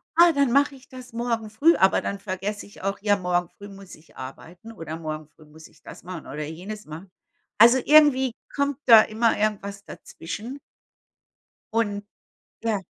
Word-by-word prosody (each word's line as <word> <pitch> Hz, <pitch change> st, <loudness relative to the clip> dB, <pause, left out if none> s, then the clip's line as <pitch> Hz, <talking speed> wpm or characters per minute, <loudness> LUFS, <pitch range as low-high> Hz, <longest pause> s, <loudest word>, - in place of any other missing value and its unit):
„Ah, 340 Hz, 0 st, +7 dB
dann 280 Hz, -3 st, +2 dB
mache 280 Hz, 0 st, +3 dB
ich 265 Hz, 0 st, -18 dB
das 255 Hz, -1 st, -11 dB
morgen 230 Hz, -2 st, -2 dB
früh.“ 300 Hz, +11 st, +4 dB
Aber 190 Hz, -, +3 dB
dann 200 Hz, -, -4 dB
vergesse 195 Hz, +2 st, -5 dB
ich 205 Hz, -, -15 dB
auch: 195 Hz, +1 st, -2 dB
Ja, 205 Hz, -1 st, +2 dB
morgen 175 Hz, -1 st, -1 dB
früh 205 Hz, -, -13 dB
muss 195 Hz, -1 st, -12 dB
ich 155 Hz, -, -23 dB
arbeiten 170 Hz, +11 st, -10 dB
oder 165 Hz, -6 st, -7 dB
morgen 155 Hz, -2 st, -6 dB
früh 155 Hz, 0 st, -21 dB
muss 155 Hz, +1 st, -15 dB
ich -, -, -25 dB
das -, -, -12 dB
machen 175 Hz, -3 st, -8 dB
oder 150 Hz, +2 st, -5 dB
jenes 190 Hz, +7 st, -8 dB
machen. 165 Hz, +5 st, -10 dB, 0.5 s
Also 235 Hz, +4 st, +7 dB
irgendwie 285 Hz, -4 st, +5 dB, 0.2 s
kommt 280 Hz, -1 st, 0 dB
da 225 Hz, -3 st, +9 dB
immer 225 Hz, +1 st, +1 dB
irgendwas 200 Hz, -1 st, -2 dB
dazwischen. 230 Hz, +11 st, -8 dB, 1.1 s
Und 205 Hz, -3 st, -1 dB, 0.6 s
ja. 220 Hz, -4 st, -1 dB
205 Hz, 170 wpm, -24 LUFS, 180-240 Hz, 1.1 s, da